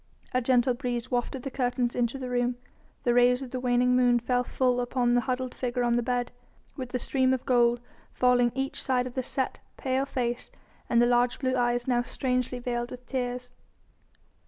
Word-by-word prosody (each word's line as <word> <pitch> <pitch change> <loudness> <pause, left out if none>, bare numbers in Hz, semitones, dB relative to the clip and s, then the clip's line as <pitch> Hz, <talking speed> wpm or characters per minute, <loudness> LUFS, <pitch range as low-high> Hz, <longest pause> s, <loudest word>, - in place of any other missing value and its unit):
A 255 - +2
gentle 250 0 +3
breeze 245 -1 -3
wafted 245 +1 -2
the 270 - -4
curtains 245 -1 -1
into 240 +2 0
the 260 -1 -5
room; 245 0 0 0.5
the 240 - +2
rays 245 +2 +4
of 255 - -9
the 255 - -3
waning 250 0 +2
moon 245 -1 +4
fell 245 +1 0
full 250 0 +1
upon 245 0 +1
the 245 - +4
huddled 255 +1 -2
figure 245 -1 -2
on 240 0 +2
the 240 - +2
bed, 245 0 -1 0.4
with 255 -3 -5
the 250 - -1
stream 260 +1 +1
of 255 - -8
gold 240 -1 +3 0.3
falling 245 -1 +3
each 270 0 -2
side 250 -2 +1
of 250 - -6
the 260 - -1
set, 260 +1 -2 0.2
pale 265 +1 0
face, 240 -2 -2 0.4
and 235 0 +4
the - - +5
large 245 0 +2
blue 260 -1 0
eyes 245 0 +1
now 245 -2 +2
strangely 250 0 -2
veiled 240 -1 -3
with 250 0 -10
tears. 250 -1 -3
250 Hz, 195 wpm, -28 LUFS, 245-255 Hz, 0.5 s, the